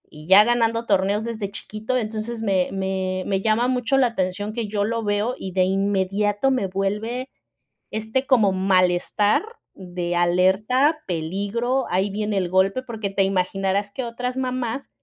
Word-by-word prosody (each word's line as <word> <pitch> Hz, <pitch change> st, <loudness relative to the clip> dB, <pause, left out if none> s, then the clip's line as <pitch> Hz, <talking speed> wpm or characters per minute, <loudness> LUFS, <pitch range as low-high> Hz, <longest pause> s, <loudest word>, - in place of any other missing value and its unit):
y 155 Hz, +1 st, -12 dB
ya 195 Hz, +3 st, +8 dB
ganando 230 Hz, 0 st, +1 dB
torneos 200 Hz, +1 st, +1 dB
desde 220 Hz, -4 st, -4 dB
chiquito. 220 Hz, +5 st, -4 dB
Entonces 225 Hz, 0 st, -4 dB
me 195 Hz, -4 st, +1 dB
me 190 Hz, -1 st, -2 dB
me 195 Hz, -1 st, 0 dB
llama 220 Hz, +3 st, +2 dB
mucho 255 Hz, +1 st, +1 dB
la 260 Hz, -2 st, +4 dB
atención 205 Hz, -1 st, -3 dB
que 230 Hz, -1 st, -3 dB
yo 205 Hz, 0 st, -1 dB
lo 230 Hz, +2 st, -1 dB
veo, 210 Hz, +4 st, 0 dB
y 190 Hz, -, -6 dB
de 185 Hz, 0 st, +2 dB
inmediato 200 Hz, +4 st, +1 dB
me 250 Hz, -7 st, 0 dB
vuelve 210 Hz, +7 st, -2 dB, 0.6 s
este 220 Hz, +5 st, -2 dB
como 225 Hz, -7 st, +4 dB
malestar 185 Hz, -, +2 dB, 0.3 s
de 175 Hz, -2 st, -4 dB
alerta, 200 Hz, -, +2 dB
peligro, 200 Hz, +10 st, -1 dB
ahí 190 Hz, +3 st, +1 dB
viene 210 Hz, 0 st, -2 dB
el 180 Hz, -2 st, 0 dB
golpe. 195 Hz, +7 st, +2 dB
Porque 225 Hz, -5 st, -4 dB
te 195 Hz, 0 st, +1 dB
imaginarás 195 Hz, +1 st, 0 dB
que 260 Hz, -, -4 dB
otras 250 Hz, +2 st, -4 dB
mamás 255 Hz, 0 st, -3 dB
205 Hz, 155 wpm, -23 LUFS, 190-235 Hz, 0.6 s, ya